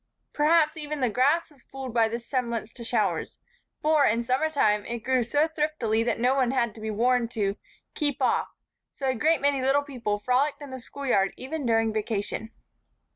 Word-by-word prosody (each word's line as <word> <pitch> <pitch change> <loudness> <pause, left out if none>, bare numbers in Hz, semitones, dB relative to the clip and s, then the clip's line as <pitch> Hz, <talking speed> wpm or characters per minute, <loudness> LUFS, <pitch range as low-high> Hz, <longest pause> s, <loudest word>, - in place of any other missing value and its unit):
Perhaps 310 +1 +3
even 300 -1 -4
the 250 -4 +1
grass 290 +9 +2
was 280 -4 -21
fooled 265 -2 -8
by 230 -2 +4
this 235 +1 -5
semblance 235 -4 -2
to 240 - -9
showers 230 -4 -1 0.5
for, 305 -1 +4
in 230 -1 +2
summer 260 +6 +1
time, 210 -9 +2
it 235 -2 -5
grew 255 -1 +2
so 290 +7 +2
thriftily 300 -8 0
that 235 - 0
no 250 +3 +2
one 265 -3 +2
had 235 -4 0
to 220 - -12
be 220 - -3
warned 240 +2 +1
to 205 -4 -1 0.4
"Keep 290 -4 -1
off," - - +1 0.4
so 275 - -7
a 260 - +2
great 310 +6 +2
many 280 -1 +2
little 275 +2 +2
people 240 -7 -3
frolicked 255 +7 +1
in 285 -3 -9
the 260 - -6
schoolyard 240 -7 -1
even 280 +1 -4
during 225 -1 +2
vacation. 215 0 -3
255 Hz, 190 wpm, -26 LUFS, 225-285 Hz, 0.5 s, by